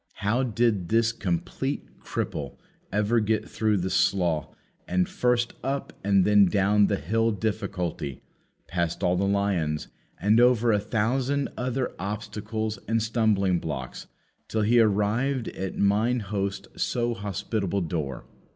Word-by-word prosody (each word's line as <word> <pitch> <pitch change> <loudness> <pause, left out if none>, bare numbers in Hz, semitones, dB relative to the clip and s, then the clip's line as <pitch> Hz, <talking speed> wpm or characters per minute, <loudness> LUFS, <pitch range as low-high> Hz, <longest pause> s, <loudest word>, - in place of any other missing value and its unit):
How 105 +5 0
did 115 -7 +1
this 115 0 +3
complete 90 -7 -3
cripple - - -4 0.3
ever 105 +3 +2
get 110 0 0
through 110 -2 +1
the 95 0 -2
Slough, 85 -4 +2 0.4
and 90 0 +1
first 125 -1 +1
up 135 +1 -2
and 100 -1 +4
then 105 -1 +6
down 100 +2 +3
the - - +1
Hill 115 +9 +1
Difficulty, 100 -8 -2
and - - -27
past 85 +1 -2
all 90 0 +3
the 100 +2 +1
lions, 95 -7 0 0.3
and 105 +4 +4
over 120 -1 +5
a 105 - +3
thousand 125 +6 0
other 125 +1 -2
obstacles 105 +2 -4
and 115 +2 +2
stumbling 110 -5 +2
blocks, 65 -6 -5 0.4
till 110 -1 0
he 120 +3 +4
arrived 115 +5 +2
at 95 0 -5
mine 110 +5 +2
host's 100 -1 -4
so 120 -1 0
hospitable 100 -2 -2
door? 80 -6 -3
105 Hz, 135 wpm, -26 LUFS, 95-115 Hz, 0.4 s, then